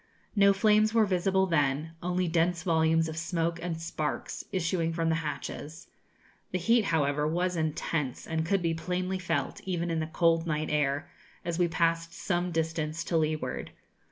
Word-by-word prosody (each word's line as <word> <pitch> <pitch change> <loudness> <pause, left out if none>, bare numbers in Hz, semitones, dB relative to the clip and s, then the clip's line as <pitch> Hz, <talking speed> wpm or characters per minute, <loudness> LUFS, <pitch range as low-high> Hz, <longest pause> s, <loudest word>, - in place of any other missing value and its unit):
No 200 -1 +6
flames 215 +2 +3
were 225 -2 +6
visible 190 0 +2
then; 150 -2 +1
only 180 +1 0
dense 170 +1 +1
volumes 160 -1 +3
of 160 - -5
smoke 165 0 -1
and 165 -2 -3
sparks, 160 -2 -3
issuing 170 -2 0
from 165 0 0
the - - +3
hatches. 155 +2 -6 0.6
The 185 - -1
heat, 225 +5 +3
however, 150 -3 +1
was 175 +3 0
intense, 155 -3 -2
and 160 0 -1
could 185 +2 +1
be 165 -1 +1
plainly 185 +3 -2
felt, 175 - -2
even 175 -2 -2
in 165 - 0
the 155 - -2
cold 165 0 +2
night 155 -1 -1
air, 145 -1 +1 0.4
as 170 0 -2
we 175 - +4
passed 165 +1 0
some 175 -2 -1
distance 160 -1 -1
to 170 - 0
leeward. 155 -1 -2
165 Hz, 165 wpm, -29 LUFS, 160-180 Hz, 0.6 s, No